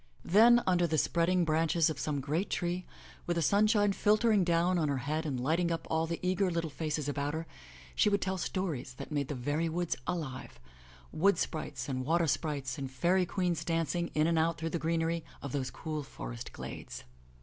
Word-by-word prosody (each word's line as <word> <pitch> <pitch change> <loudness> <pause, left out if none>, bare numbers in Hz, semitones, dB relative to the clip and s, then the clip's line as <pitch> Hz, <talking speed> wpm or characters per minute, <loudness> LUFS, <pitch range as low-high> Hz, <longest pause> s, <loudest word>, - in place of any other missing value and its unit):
Then, 235 +6 +6
under 175 -2 +3
the 160 -1 0
spreading 170 +3 +2
branches 160 +1 +2
of 155 -3 -3
some 145 -1 -1
great 155 +8 -1
tree, 175 0 -2 0.4
with 175 - +1
the 170 - +1
sunshine 205 +2 +3
filtering 215 0 +3
down 175 +1 +2
on 155 -3 +1
her 140 - 0
head 155 +2 -1
and 135 -4 -2
lighting 165 +7 +1
up 165 - -2
all 160 0 +1
the 170 0 -3
eager 185 +1 +2
little 165 -2 -2
faces 150 -1 -2
about 145 +1 -2
her, 160 +1 -4 0.5
she 210 - +3
would 200 0 +2
tell 190 0 -2
stories 165 -10 -3
that - - -8
made 145 -2 -1
the 145 - -4
very 145 +6 -1
woods 175 +1 -1
alive 135 - -4 0.3
— 60 0 -21
^wood 195 +2 +4
sprites 140 -5 -3
and 130 -2 -2
water 165 +5 +2
sprites 145 -2 -2
and 135 -1 -4
fairy 175 +8 +2
queens 180 -4 -1
danc 165 -1 0
ing 175 -1 -1
in 155 0 +3
and 165 0 +2
out 165 +1 +1
through 165 +1 -3
the 170 - -1
greenery 165 0 0 0.2
of 140 - -6
those 130 -2 -2
cool 155 +1 -4
forest - - -7
glades. - - -8
165 Hz, 205 wpm, -31 LUFS, 145-175 Hz, 0.5 s, Then